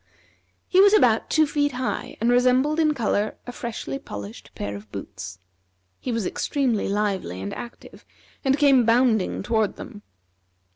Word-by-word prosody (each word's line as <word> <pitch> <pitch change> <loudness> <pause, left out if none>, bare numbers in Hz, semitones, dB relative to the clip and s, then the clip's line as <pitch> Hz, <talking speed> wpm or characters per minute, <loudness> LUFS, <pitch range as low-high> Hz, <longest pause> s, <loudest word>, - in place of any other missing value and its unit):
He 375 - +5
was 405 +1 +6
about 235 - +3
two 315 0 +4
feet 290 -1 0
high, 255 0 -4
and 230 +2 +2
resembled 255 +5 +3
in 305 -2 +3
color 215 -3 -1
a 245 - -6
freshly 225 - -5
polished 100 +1 -9
pair 100 0 -4
of 100 +1 -11
boots. 90 -2 -8 0.6
He 250 - -4
was 230 -4 -1
extremely 250 -1 -1
lively 195 - -1
and 95 +1 -5
active, 240 - -10 0.4
and 270 0 +2
came 275 -4 +5
bounding 230 -5 +2
toward 220 -1 0
them. 205 - -10
235 Hz, 150 wpm, -24 LUFS, 195-265 Hz, 0.6 s, was